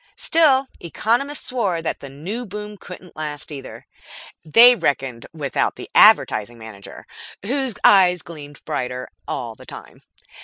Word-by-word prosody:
Still, 280 -5 +3
economists 240 - -1
swore 205 -9 -1
that 165 - -4
the 140 - -10
new 180 - -6
boom 210 +1 -8
couldn't 180 -2 -12
last 150 -1 -6
either. 135 -3 -9 0.6
They 230 +10 +7
reckoned 135 - -2
without 145 -4 -2
the - - -11
Advertising 115 +3 +5
Manager, 110 -3 -12 0.4
whose 260 0 -2
eyes 180 -3 +5
gleamed 145 -3 -12
brighter 125 0 -4 0.2
all 120 -4 -4
the - - -16
time. - - -12
170 Hz, 130 wpm, -20 LUFS, 135-225 Hz, 0.6 s, They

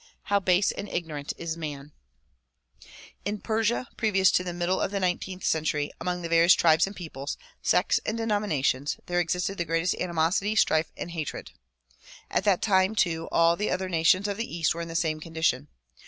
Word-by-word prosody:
How 200 - +5
base 185 0 +3
and 200 0 -6
ignorant 150 -4 -4
is 165 -1 -4
man! 150 -3 -6 1.3
In 205 +2 -3
Persia 225 +4 0
previous 195 -4 +3
to 180 - +2
the 180 - -4
middle 175 +2 -1
of - - 0
the 200 0 -2
nineteenth 185 0 -2
century, 150 -2 0
among 180 -1 -2
the - - -2
various 170 +2 +6
tribes 160 +1 +4
and 200 - -8
peoples, 145 -5 -6 0.2
sects - - +2
and 220 - -2
denominations 200 - 0
there 175 0 0
existed 180 +3 -1
the - - +2
greatest 165 +2 +1
animosity, 180 +5 0
strife 160 -6 +2
and 175 - -5
hatred. 160 -4 -5 0.8
At - - 0
that 195 -4 +2
time 190 0 +3
too 165 -5 0
all 170 0 +4
the 210 +4 -2
other 185 0 -2
nations 180 +4 +3
of 200 -1 -3
the 230 -7 -4
east 165 - +2
were 170 - -5
in 170 - -5
the 165 - -7
same 160 -2 0
condition. 160 -4 -1
175 Hz, 185 wpm, -27 LUFS, 160-195 Hz, 1.3 s, various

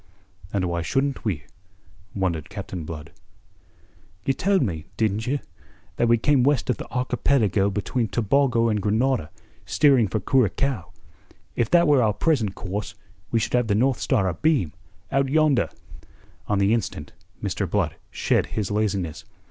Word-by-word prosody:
"And 95 -2 0
why 85 -1 -1
shouldn't 135 +9 -1
we?" 90 -11 -2 0.7
wondered 85 -6 -1
Captain 95 -4 -6
Blood. 75 -2 -8 1.1
"You 135 - +2
told 195 +6 +2
me 80 -5 -3
didn't 110 0 0
you? 140 +3 +1 0.6
that 120 - +2
we 115 0 +5
came 140 +3 +3
west 135 -1 +2
of 125 - -2
the - - -9
archipelago 120 -5 +1
between 110 +4 -1
Tobago 120 +1 +2
and 105 -2 0
Grenada, 110 - +1 0.3
steering 110 +4 +4
for 100 +4 -1
Curacao. 125 -2 0 0.6
If 115 -2 0
that 170 -1 +5
were 145 -3 +5
our 110 -3 +2
present 110 - +1
course, 100 +2 -5 0.3
we 115 - +1
should 110 - -2
have 125 -2 +2
the 100 - +2
North 130 +3 +2
Star 105 -9 +1
abeam, 95 - +1 0.4
out 135 0 +2
yonder." 155 -3 +3 0.8
On 100 - +1
the 100 +2 +3
instant 115 -4 -3 0.3
Mr. - - -2
Blood - - 0
shed - - +1
his 105 -3 -3
laziness. 95 -5 -1
110 Hz, 150 wpm, -24 LUFS, 95-135 Hz, 1.1 s, we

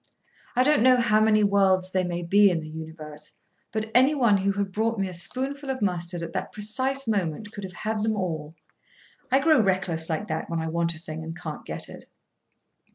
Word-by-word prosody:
I 250 - +4
don't 295 0 +3
know 255 +1 +6
how 215 -3 +3
many 215 -1 +4
worlds 190 -2 +3
there 185 -1 +1
may 175 -1 -3
be 200 +4 +5
in 170 -3 -1
the 155 - -8
universe, 155 -1 -9 0.4
but 220 0 -3
anyone 250 -4 +4
who 195 +1 0
had 200 -1 -2
brought 225 +3 0
me 195 -1 0
a 185 - -6
spoonful 270 +10 -3
of 265 -1 -2
mustard 175 -3 -1
at 165 - -6
that - - -3
precise 260 +6 -2
moment 205 -1 -1
could 205 - -8
have 185 -1 -7
had 215 -1 -1
them 220 0 +1
all. 160 -5 -4 0.8
I 265 - +5
grow 305 -2 +4
reckless 185 -5 0
like 165 +6 -2
that 160 0 -3
when 170 -1 -1
I 160 0 -2
want 170 0 +1
a - - -10
thing 160 -1 -7
and 165 +1 -7
can't 155 -2 -7
get - - -4
it. - - -11
195 Hz, 210 wpm, -26 LUFS, 170-220 Hz, 0.8 s, know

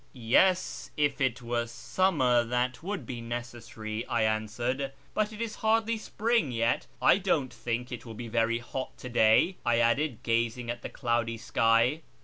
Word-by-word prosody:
" - - -35
Yes, 170 +10 +2
if 145 -2 +1
it 130 -2 0
were 120 0 -1
summer 130 -1 +2
that 125 +2 -1
would 180 -5 -4
be 120 0 -6
necessary," 120 -2 -5
I 115 -2 +1
answered, 120 +5 -1
" - - -32
but 215 0 0
it 215 - -10
is 230 -2 -4
hardly 225 0 +2
spring 225 - 0
yet. 115 0 0
I - - +5
don't 160 -9 0
think 120 +2 -3
it 120 - -6
will 115 -2 -9
be 120 +2 -6
very 115 0 +1
hot 130 +2 -6
to 125 - -8
day," 120 +10 +4
I 120 -1 +2
added, 120 +2 +1
gazing 115 +1 0
at 120 0 -6
the - - -6
cloudy 115 -1 -1
sky. 115 +6 +2
120 Hz, 175 wpm, -29 LUFS, 115-145 Hz, -, I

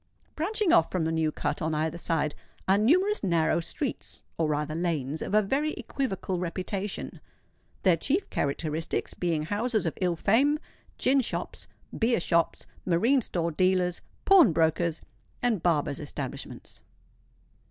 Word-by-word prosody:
Branching 395 +4 +1
off 165 - +5
from 180 -3 -1
the 160 - 0
New 160 -1 +1
Cut, - - -3
on 160 0 0
either 160 +2 -1
side, 155 -3 0 0.3
are 195 +1 +4
numerous 370 - +3
narrow 170 -3 +2
streets,—or 165 -1 -4
rather 150 0 -1
lanes, 160 -4 -2
of 205 - -2
a 215 - +5
very 285 +9 0
equivocal 195 -8 -3
reputation; 190 +3 -4 0.6
their 180 -4 +5
chief 320 - 0
characteristics 155 +3 -2
being 165 -4 -1
houses 215 +4 -1
of 165 - -1
ill 180 -2 +2
fame, 260 - +3 0.4
gin 270 +1 +3
shops, 240 - -4 0.3
beer 235 -1 +2
shops, 170 -1 +1 0.2
marine 225 +10 +3
store 170 -6 -2
dealers, 180 +1 +1 0.2
pawnbrokers, 170 - +4 0.4
and 230 -7 +1
barbers' 150 -5 +1
establishments. 140 -2 -7
175 Hz, 130 wpm, -28 LUFS, 160-225 Hz, 0.6 s, off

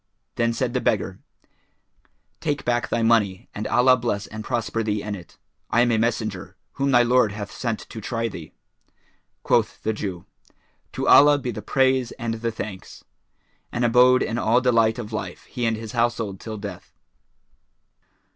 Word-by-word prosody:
Then 115 -1 +1
said 120 +1 -2
the 125 - 0
beggar, 95 -3 -1 1.2
"Take 150 -3 -2
back 120 0 0
thy 115 - 0
money 105 -5 +2
and 105 +1 -4
Allah 130 +1 +5
bless 115 -5 -2
and 110 0 -8
prosper 115 -2 -2
thee 105 -2 -1
in 105 - -4
it; 90 -4 -10 0.3
I 120 - +3
am 120 -1 +3
a 110 - +2
Messenger,[FN#416] 110 -4 -2 0.2
whom 140 0 -1
thy 120 -2 +5
Lord 120 -3 +3
hath 105 -1 -6
sent 115 -3 -3
to 110 - -9
try 115 +2 -2
thee." 85 -8 -9 0.9
Quoth - - +1
the 110 - 0
Jew, 95 -5 -5 0.7
"To - - -3
Allah 145 0 +7
be 125 -3 -4
the 110 - -6
praise 130 +2 +1
and 115 -3 -3
the 115 0 -1
thanks!" 105 -4 -8 0.7
and 120 +1 0
abode 125 +2 +5
in 115 - -2
all 115 +2 +3
delight 115 -3 +3
of 110 -2 -7
life 90 -4 -5
he 120 -3 -3
and 115 -1 0
his 110 -1 -7
household 115 -5 -1
till 110 -1 -6
death. 100 -3 -9
115 Hz, 170 wpm, -23 LUFS, 105-125 Hz, 1.2 s, Allah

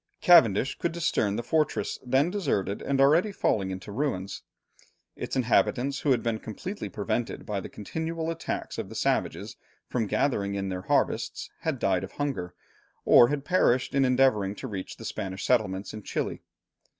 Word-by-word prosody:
Cavendish 130 - +5
could 170 -1 -1
discern 115 -11 0
the 120 - -3
fortress, 155 +4 0
then 135 +6 +2
deserted 135 - -1
and 140 -1 -1
already 160 +9 +4
falling 100 - 0
into 95 +1 -6
ruins. 100 -6 -2 0.7
Its - - -5
inhabitants, 130 +2 +2
who 145 - -1
had 125 -4 +3
been 115 -2 -1
completely 185 - -6
prevented 110 +3 -3
by 105 -2 -2
the - - -7
continual 160 +8 -4
attacks 165 - -4
of - - -4
the - - -9
savages - - -1 0.3
from 115 -4 -1
gathering 100 -6 0
in 95 -1 -2
their 90 -1 -3
harvests, - - 0
had 160 -4 -2
died 95 -5 +1
of 95 - -8
hunger, 95 -12 -3 0.5
or 120 - +8
had 145 +1 -2
perished 130 -9 +2
in 135 0 +3
endeavouring 125 -6 +3
to 130 - -6
reach 95 -5 -6
the - - -9
Spanish 95 -3 -4
settlements 105 -5 0
in 110 - -7
Chili. - - -3
120 Hz, 165 wpm, -27 LUFS, 100-145 Hz, 0.7 s, or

